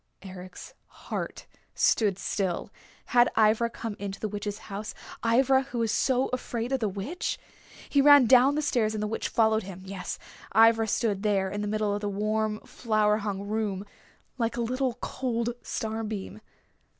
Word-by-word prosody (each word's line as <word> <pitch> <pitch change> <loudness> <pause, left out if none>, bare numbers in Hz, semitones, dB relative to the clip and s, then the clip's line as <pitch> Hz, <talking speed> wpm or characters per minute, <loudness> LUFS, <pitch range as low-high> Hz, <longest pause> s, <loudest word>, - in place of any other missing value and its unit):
Eric's 185 -1 -10
heart - - -6 0.3
stood 205 -5 +3
still. 190 -3 -2 0.4
Had 240 0 +6
Ivra 220 +2 +4
come 225 -2 -6
into 195 -1 -5
the 215 - -2
Witch's 205 0 -4
house, 210 +1 -7 0.3
Ivra 265 +3 +4
who 265 -2 -7
was 230 -2 +1
so 255 +3 +2
afraid 240 -1 -3
of 270 - +1
the 215 -3 0
Witch? 205 - -3 0.5
He 280 - +3
ran 285 -2 +8
down 255 +4 +6
the 305 - 0
stairs 220 -6 +1
and 210 - -2
the - - 0
Witch 220 - -2
followed 220 -1 +3
him. 185 -2 -9
Yes, 195 0 -5 0.4
Ivra 225 0 +6
stood 210 -2 0
there 195 -3 +1
in 205 +1 -3
the 210 - -2
middle 210 -1 0
of 205 - -2
the 205 - -1
warm, 215 +1 -1
flower 215 -3 +1
hung 205 -2 -3
room, 205 -2 -2 0.5
like 230 0 0
a - - 0
little 255 +1 -1
cold 235 -2 -2
star 220 0 -3
beam. 210 -1 -5
220 Hz, 170 wpm, -28 LUFS, 205-235 Hz, 0.5 s, ran